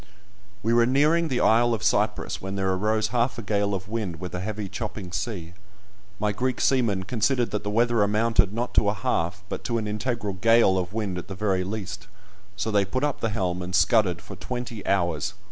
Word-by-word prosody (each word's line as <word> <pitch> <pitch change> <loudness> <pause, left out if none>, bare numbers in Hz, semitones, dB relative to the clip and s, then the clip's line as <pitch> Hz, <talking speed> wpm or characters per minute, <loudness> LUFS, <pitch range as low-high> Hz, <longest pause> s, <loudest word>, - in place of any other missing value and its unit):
We 115 +2 +2
were 120 0 +5
nearing 155 +6 +3
the 130 -5 0
isle 120 +1 +4
of 105 - -7
Cyprus - - 0
when 95 +1 -4
there 95 -1 0
arose 110 +3 +1
half 120 +1 0
a 115 - -5
gale 100 0 0
of 95 0 -6
wind, 105 -7 -3
with 90 0 -6
a 90 - -3
heavy 105 +2 -4
chopping 105 -2 -6
sea. 85 -4 -4 0.7
My 105 0 +1
Greek 125 +4 -1
seamen 115 -8 +2
considered 120 +4 0
that 105 0 -2
the 105 - -2
weather 115 +1 +2
amounted 105 -2 +2
not 120 +3 -3
to 100 - +3
a 105 - -1
half, 90 0 -1
but - - -5
to 115 - 0
an 110 -2 -2
integral 105 -1 -2
gale 115 0 +4
of 90 0 -3
wind 100 -4 -2
at - - -9
the 95 - -6
very 95 -2 0
least, 105 +1 -5 0.5
so 105 +3 -2
they 100 -1 +3
put 130 +8 -2
up 150 - 0
the 115 - 0
helm, 90 -4 -1
and 90 +1 -3
scudded 100 -6 +3
for - - -9
twenty 120 -4 -5
hours. 85 0 0
105 Hz, 210 wpm, -25 LUFS, 95-115 Hz, 0.7 s, were